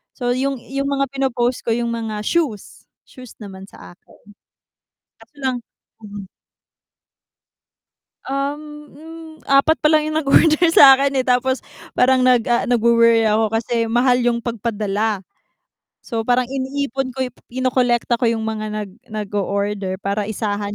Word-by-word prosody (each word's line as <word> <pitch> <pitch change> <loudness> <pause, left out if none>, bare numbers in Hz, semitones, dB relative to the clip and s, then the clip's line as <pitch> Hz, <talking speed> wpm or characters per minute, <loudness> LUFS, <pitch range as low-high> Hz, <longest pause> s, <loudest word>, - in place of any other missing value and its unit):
So 245 -2 -2
yung 270 +2 -1 0.2
yung 275 0 -2
mga 275 -1 -1
pinopost 255 -2 -1
ko 225 - +2
yung 235 0 -2
mga 220 -2 -4
shoes. 270 - -3 0.2
Shoes 255 -3 -14
naman 195 -1 -10
sa - - -14
akin. - - -23 1.1
Kaso - - -20
lang 265 -3 -2 2.7
Uhm, 275 +2 -3 0.3
hmm, 325 +2 -11 0.2
4 275 +4 +3
palang 305 0 +3
yung 310 - -3
nag-order 310 +4 +4
sa'kin 275 -2 +7
eh 260 - -1
tapos 255 +1 +1 0.3
parang 255 0 +3
nag, 250 -1 +5
ah, 240 -1 +2
nagwo-worry 230 -1 +4
ako 215 0 +1
kasi 230 0 -2
mahal 245 +2 +3
yung 240 -1 +1
pagpadala. 215 -3 -3 0.7
So 225 -3 -4
parang 245 +2 +1
iniipon 270 0 -3
ko 260 0 -3 0.2
kinukolekta 250 -1 0
ko 240 - 0
yung 225 -1 -2
mga 215 -1 -3
nag 210 -2 -5 0.2
nag-order 200 -2 -3
para 200 +1 -2
isahan 205 -1 -3
240 Hz, 130 wpm, -19 LUFS, 220-270 Hz, 2.7 s, sa'kin